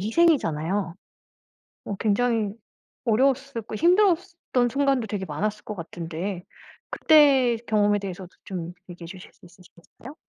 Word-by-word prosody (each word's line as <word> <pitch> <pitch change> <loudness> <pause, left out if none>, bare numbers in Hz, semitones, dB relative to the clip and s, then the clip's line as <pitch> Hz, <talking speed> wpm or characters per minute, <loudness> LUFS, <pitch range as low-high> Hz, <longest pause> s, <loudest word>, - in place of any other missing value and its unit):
희생이잖아요. 200 - +1 0.9
어 205 - -4
굉장히 220 -1 +1 0.5
어려웠을 260 +2 +1
고 220 - -10
힘들었던 345 - +2
순간도 275 -2 +1
되게 200 -2 -4
많았을 205 +7 -3
것 210 - -6
같은데. 170 +2 -5 0.5
그때 275 -6 +5
경험에 205 -1 +2
대해서도 190 -2 -7 0.2
좀 175 -2 -6 0.2
얘기해 175 -1 -9
주실 180 +1 -11
수 - - -21
있으시겠어요? 180 - -16
210 Hz, 310 characters per minute, -25 LUFS, 185-270 Hz, 0.9 s, 그때